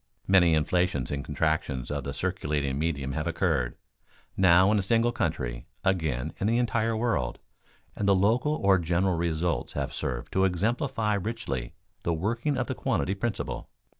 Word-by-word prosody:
Many 90 -4 +5
inflations 80 -2 +1
and 70 -1 -2
contractions 75 -3 -1
of - - -2
the - - -3
circulating 70 -2 -2
medium 70 -4 -1
have 75 +4 -2
occurred, 80 -8 0 0.6
now 95 +1 +5
in 105 - +3
a - - +2
single 115 +4 +2
country, - - -2 0.2
again 80 -7 0
in 100 - 0
the 115 +2 +2
entire 115 -2 +1
world, 105 - 0 0.6
and 100 - -1
the 100 - +5
local 115 +10 +2
or 100 -7 +3
general 85 +2 +1
results 85 -4 -1
have - - -3
served 60 -3 -4
to 95 - +3
exemplify 110 - 0
richly 95 - -3 0.3
the 85 - 0
working 115 - -1
of 130 - 0
the - - -3
quantity 95 - 0
principle. 110 +3 -3
90 Hz, 160 wpm, -27 LUFS, 75-110 Hz, 0.6 s, Many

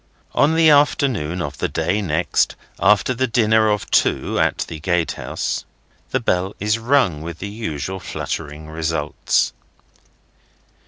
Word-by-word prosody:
On 150 +3 +3
the 160 -1 +6
afternoon 125 - +2
of 70 -3 -6
the - - 0
day 90 +6 -1
next 90 -2 +1 0.2
after 105 +5 +3
the 130 +1 0
dinner 110 -2 +3
of 105 -1 -1
two - - +2
at - - +1
the 80 - -7
gatehouse, 85 0 -2 0.5
the - - 0
bell 90 +2 0
is 105 +3 +1
rung 115 - +2
with 85 0 -6
the 100 - -5
usual 95 -4 -4
fluttering 75 -3 -5
results. 80 -1 0
95 Hz, 130 wpm, -20 LUFS, 80-115 Hz, 0.5 s, the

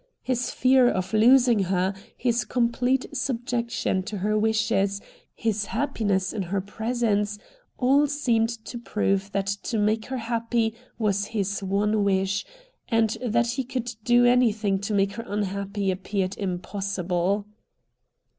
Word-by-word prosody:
His 250 -1 -1
fear 255 -1 +4
of 185 0 -2
losing 235 -2 +5
her, 185 +1 0 0.2
his 240 -1 +1
complete 245 +2 +1
subjection 240 -6 -1
to 210 - -4
her 210 +3 0
wishes, 215 -2 +1 0.4
his 215 -2 -1
happiness 205 -7 -1
in 215 - -2
her 190 +2 -1
presence, 210 0 -1 0.4
all 275 +3 +4
seemed 240 -6 +1 0.2
to 240 - -6
prove 195 -3 -1
that 195 -1 -1
to 200 +4 -2
make 215 +1 +1
her 260 - -3
happy 230 -1 -1 0.2
was 205 -3 +1
his 200 -2 -2
one 205 +2 +1
wish, 195 0 +1 0.5
and 225 -1 +3
that 235 0 +1
he 265 +2 -2
could 245 -1 -4
do 245 +1 +5
anything 220 -5 +3
to 205 +1 -2
make 195 0 +2
her 230 +3 -7
unhappy 200 -1 -2
appeared 190 0 -2
impossible. 190 0 -2
215 Hz, 135 wpm, -25 LUFS, 195-240 Hz, 0.5 s, losing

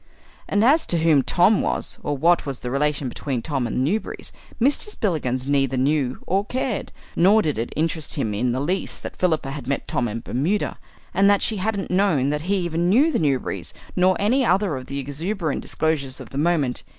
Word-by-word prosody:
And 205 +2 +3
as 300 +6 +4
to 170 - +1
who 160 -3 +4
Tom 180 - +3
was, - - -1
or 145 -1 -2
what 170 +4 +3
was 135 -2 -4
the 125 - -4
relation 145 0 0
between 125 -1 -3
Tom 135 -4 -1
and 125 +3 0
the 150 - +1
Newberrys, - - -8 0.3
Mr. 280 - +2
Spillikins 145 - -1
neither 135 -2 +1
knew 135 -1 +1
or 195 +2 +1
cared; 250 0 -3 0.2
nor 205 +5 +5
did 150 -7 -1
it 115 - -3
interest 160 -1 -1
him 110 -8 -1
in 120 +4 0
the 125 - -1
least 180 +7 -2
that - - -6
Philippa 160 -6 0
had 135 -3 -7
met 140 - -2
Tom 120 - 0
in 115 +1 -4
Bermuda, 155 - -1 0.3
and 195 +2 +4
that 205 -1 +3
she 220 - 0
hadn't 200 0 -2
known 175 -8 +2
that 150 0 -2
he 200 - +3
even 170 0 0
knew 275 - +4
the - - 0
Newberry's 140 -5 -1 0.2
nor 185 +1 +3
any 250 +7 +2
other 195 - +2
of 130 -1 -7
the 140 - -5
exuberant 155 +5 -3
disclosures 140 -5 -1
of - - -10
the 135 - -6
moment. 150 -6 +1
155 Hz, 205 wpm, -23 LUFS, 135-195 Hz, 0.3 s, nor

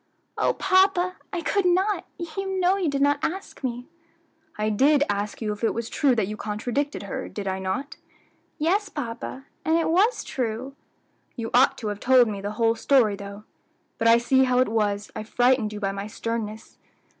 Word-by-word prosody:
"O - - +1
papa! 375 -1 +2
I 355 -4 -3
could 400 +4 +1
not; 380 +4 +1 0.3
you 385 -1 -2
know 365 +1 +3
you 370 -5 0
did 280 0 0
not 285 0 +3
ask 375 -3 -4
me." 245 -1 -3 0.7
"I 215 0 0
did 280 +7 +4
ask 205 +2 -3
you 210 -1 -1
if 210 - -11
it 225 - +1
was 230 0 -4
true 275 -4 +2
that 220 -4 +1
you 210 - -4
contradicted 235 +7 -3
her, 200 - -5
did 205 -2 -6
I 190 0 -1
not?" 215 +10 -4 0.6
"Yes, 380 +6 +1
papa, 260 -1 -6 0.2
and 320 +1 +2
it 330 -1 +1
was 410 +8 +3
true." 250 +2 -4 0.6
"You 230 -2 -5
ought 265 +2 +5
to 220 - -4
have 205 -1 -4
told 255 0 +5
me 205 -2 -4
the 205 +1 -4
whole 230 -1 +3
story 230 -4 +3
though; 200 +1 -9 0.6
but 230 - +2
I 230 0 +7
see 260 +2 +3
how 250 -1 +1
it 255 -2 +3
was 210 -2 -1
I 215 - -4
frightened 245 0 +2
you 210 - -6
by 195 -2 -1
my 200 +1 -5
sternness. 220 0 -5
245 Hz, 190 wpm, -25 LUFS, 215-300 Hz, 0.7 s, I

